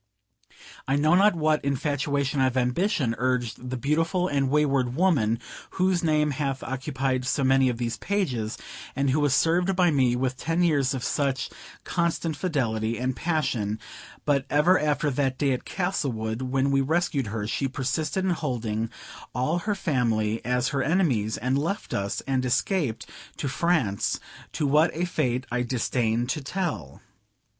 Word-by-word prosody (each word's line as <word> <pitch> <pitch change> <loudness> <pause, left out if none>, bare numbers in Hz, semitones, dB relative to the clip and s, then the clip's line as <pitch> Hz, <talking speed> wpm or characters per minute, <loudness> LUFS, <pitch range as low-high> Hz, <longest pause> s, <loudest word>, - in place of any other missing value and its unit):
I 135 - +2
know 155 +3 +3
not 195 +2 +5
what 155 -1 +1
infatuation 140 0 0
of 130 -1 +2
ambition 130 - +1
urged 125 -1 -1
the 130 - -3
beautiful 165 +7 +1
and 140 -5 +1
wayward 135 -4 +2
woman, 140 - +2 0.4
whose 185 -2 +2
name 150 -2 +2
hath 135 -1 -2
occupied 130 -1 -2
so 135 +2 0
many 135 0 +4
of 120 - -2
these 120 -1 -2
pages, 130 - -1 0.4
and 140 -1 +1
who 145 - +2
was 145 -2 +3
served 175 +4 +2
by 180 -2 +4
me 130 -4 +3
with 130 0 -1
ten 165 +5 0
years 140 -6 +2
of 125 - -4
such 135 -2 -1 0.3
constant 170 -2 -1
fidelity 115 - -1
and 125 +2 -1
passion; 130 -9 -1 0.5
but 140 -2 +2
ever 165 +6 +4
after 150 -1 +1
that 130 -1 0
day 140 -2 +1
at 125 - -2
Castlewood, 125 - -2
when 135 +1 0
we 135 0 +3
rescued 150 -3 0
her, 105 0 -3
she 135 +5 -1
persisted 140 +7 -2
in 190 - +2
holding 115 -8 -2 0.5
all 150 +8 +1
her 210 +3 -1
family 115 - 0
as 125 +1 +1
her 135 -1 -1
enemies, 135 - +1
and 130 +4 0
left 170 +8 -3
us, 100 0 -2
and 130 -2 -1
escaped 130 - 0 0.3
to 145 - -2
France, 135 - 0 0.3
to 150 - -1
what 150 +4 +4
a 175 +2 0
fate 130 -7 -1
I 125 0 0
disdain 120 -1 0
to 140 +4 -2
tell. 135 - -4
135 Hz, 160 wpm, -26 LUFS, 125-155 Hz, 0.5 s, not